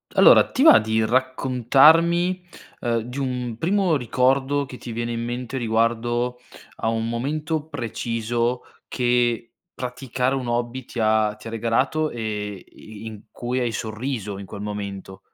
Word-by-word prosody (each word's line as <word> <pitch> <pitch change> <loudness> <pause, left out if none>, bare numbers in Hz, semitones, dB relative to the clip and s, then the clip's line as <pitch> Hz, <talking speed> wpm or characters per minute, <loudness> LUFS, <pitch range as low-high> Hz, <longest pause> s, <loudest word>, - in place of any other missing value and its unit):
Allora, - - +7
ti 265 - +1
va 320 -1 +9
di 110 0 0
raccontarmi, 135 +9 +3 0.4
ehm, 115 -2 0
di 125 +5 -6
un 125 -4 -3
primo 185 -1 +2
ricordo 135 +2 +1
che 130 -1 -10
ti 120 - -8
viene 120 +1 -3
in 115 0 -3
mente 120 +2 -4
riguardo 120 +1 0 0.4
a - - -2
un 115 0 -1
momento 150 +6 -2
preciso 120 -2 -2 0.2
che 120 -1 0 0.2
praticare 125 0 -2
un 130 -2 -2
hobby 120 +2 -2
ti 120 - -7
ha 110 -1 +2
ti 105 - -17
ha - - -4
regalato, 130 +7 0
e 105 -4 -4
i 110 0 -13
i - - -8
in 110 -1 -9
cui 125 +1 -3
hai 120 -2 0
sorriso 110 -2 -4
in 100 - -9
quel 100 - -8
momento? 100 -2 -6
120 Hz, 155 wpm, -23 LUFS, 115-130 Hz, 0.4 s, va